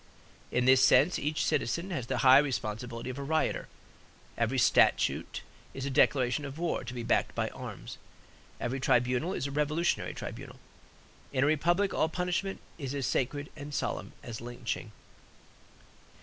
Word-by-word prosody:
In 125 Hz, 0 st, +1 dB
this 130 Hz, 0 st, +6 dB
sense 170 Hz, +6 st, +5 dB
each 150 Hz, +1 st, -1 dB
citizen 170 Hz, +10 st, -1 dB
has 130 Hz, -9 st, -3 dB
the -, -, -1 dB
high 130 Hz, +1 st, +9 dB
responsibility 120 Hz, -3 st, -3 dB
of 130 Hz, -, -8 dB
a -, -, -4 dB
rioter. 155 Hz, +3 st, 0 dB, 0.7 s
Every 115 Hz, +3 st, 0 dB
statute 120 Hz, -, +3 dB, 0.3 s
is 135 Hz, -, -4 dB
a 140 Hz, -, -2 dB
declaration 130 Hz, 0 st, +3 dB
of 140 Hz, 0 st, -7 dB
war, 170 Hz, -4 st, -1 dB
to 120 Hz, 0 st, -7 dB
be 120 Hz, -, -4 dB
backed -, -, +1 dB
by -, -, 0 dB
arms. -, -, -8 dB, 0.6 s
Every 125 Hz, +3 st, -2 dB
tribunal 125 Hz, +5 st, +1 dB
is -, -, -2 dB
a 140 Hz, -, -3 dB
revolutionary 150 Hz, +4 st, 0 dB
tribunal. -, -, -8 dB, 0.7 s
In 130 Hz, -1 st, +1 dB
a -, -, +4 dB
republic 175 Hz, +6 st, +2 dB
all 160 Hz, -, +1 dB
punishment 180 Hz, +3 st, -2 dB, 0.2 s
is 140 Hz, -1 st, -4 dB
as 140 Hz, -2 st, -1 dB
sacred 145 Hz, +3 st, -1 dB
and 145 Hz, -1 st, -7 dB
solemn -, -, -3 dB
as 115 Hz, -2 st, -7 dB
lynching. 120 Hz, -2 st, -5 dB
135 Hz, 155 wpm, -30 LUFS, 125-155 Hz, 0.7 s, high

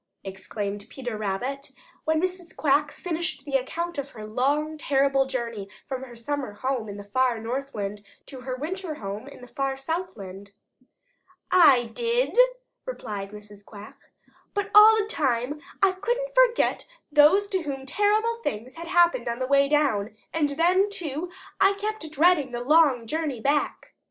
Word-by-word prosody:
exclaimed 200 Hz, +1 st, -5 dB
Peter 245 Hz, -4 st, -5 dB
Rabbit 240 Hz, +7 st, -4 dB, 0.3 s
when 315 Hz, 0 st, +2 dB
Mrs. 360 Hz, -1 st, -3 dB
Quack 290 Hz, 0 st, +2 dB
finished 345 Hz, -1 st, -4 dB
the 285 Hz, -, -7 dB
account 335 Hz, +5 st, -1 dB
of 280 Hz, 0 st, -5 dB
her 215 Hz, -4 st, -9 dB
long, 285 Hz, +8 st, 0 dB
terrible 275 Hz, -2 st, +2 dB
journey 230 Hz, -6 st, -4 dB, 0.2 s
from 260 Hz, -1 st, -4 dB
her 250 Hz, -2 st, -10 dB
summer 255 Hz, -1 st, -4 dB
home 250 Hz, 0 st, -2 dB
in 200 Hz, -, -7 dB
the 205 Hz, -, -8 dB
far 245 Hz, +3 st, +1 dB
Northland 225 Hz, -4 st, -4 dB, 0.2 s
to 265 Hz, -, -9 dB
her 255 Hz, 0 st, -4 dB
winter 325 Hz, +4 st, -4 dB
home 205 Hz, +1 st, -6 dB
in 280 Hz, -, -12 dB
the 250 Hz, -, -11 dB
far 270 Hz, +1 st, -2 dB
Southland. 205 Hz, -, -5 dB, 1.0 s
"I 265 Hz, -10 st, +6 dB
did," 475 Hz, +1 st, 0 dB, 0.5 s
replied 205 Hz, -, -5 dB
Mrs. 210 Hz, 0 st, -13 dB
Quack, 205 Hz, +1 st, -12 dB, 0.6 s
"but 405 Hz, 0 st, -2 dB
all 430 Hz, +1 st, +9 dB
the 425 Hz, -, +1 dB
time 280 Hz, -, -1 dB, 0.2 s
I 390 Hz, -, +6 dB
couldn't 485 Hz, +6 st, -2 dB
forget -, -, +3 dB, 0.2 s
those 300 Hz, +7 st, +6 dB
to 380 Hz, -2 st, 0 dB
whom 275 Hz, -4 st, -5 dB
terrible 420 Hz, -, +1 dB
things 230 Hz, -, -4 dB
had 335 Hz, 0 st, -7 dB
happened 345 Hz, -9 st, +3 dB
on 235 Hz, -, -2 dB
the 255 Hz, -, -2 dB
way 275 Hz, +1 st, +3 dB
down, 225 Hz, -9 st, +1 dB, 0.2 s
and 305 Hz, -3 st, +1 dB
then, 355 Hz, +7 st, +3 dB
too, 350 Hz, -4 st, -4 dB, 0.3 s
I 390 Hz, +1 st, +5 dB
kept 415 Hz, -4 st, -4 dB
dreading 310 Hz, -4 st, +3 dB
the 240 Hz, -, -3 dB
long 285 Hz, -4 st, +4 dB
journey 300 Hz, -1 st, -2 dB
back." 285 Hz, +5 st, -1 dB
275 Hz, 155 wpm, -25 LUFS, 235-345 Hz, 1.0 s, all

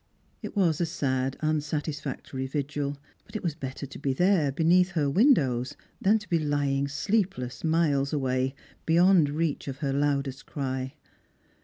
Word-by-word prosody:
It -, -, -7 dB
was 175 Hz, -5 st, +2 dB
a 170 Hz, -, +1 dB
sad 130 Hz, -4 st, -1 dB
unsatisfactory 150 Hz, -3 st, -2 dB
vigil; 145 Hz, 0 st, -3 dB, 0.3 s
but -, -, -17 dB
it 215 Hz, -, -3 dB
was 170 Hz, -4 st, 0 dB
better 140 Hz, -2 st, -6 dB
to 140 Hz, -, -10 dB
be 135 Hz, -, 0 dB
there, 175 Hz, -2 st, +3 dB
beneath 175 Hz, +5 st, +3 dB
her 155 Hz, -4 st, +1 dB
windows, 140 Hz, -, +3 dB, 0.3 s
than 210 Hz, +3 st, +4 dB
to 210 Hz, -1 st, -9 dB
be 170 Hz, -, +2 dB
lying 145 Hz, -2 st, 0 dB
sleepless 175 Hz, -, -1 dB
miles 155 Hz, -4 st, +2 dB
away, 130 Hz, -2 st, 0 dB, 0.3 s
beyond 170 Hz, -1 st, +5 dB
reach 155 Hz, 0 st, -2 dB
of 135 Hz, -1 st, -4 dB
her 135 Hz, -1 st, -1 dB
loudest 140 Hz, -1 st, -1 dB
cry. 130 Hz, -1 st, -3 dB
145 Hz, 150 wpm, -27 LUFS, 135-165 Hz, 0.3 s, beyond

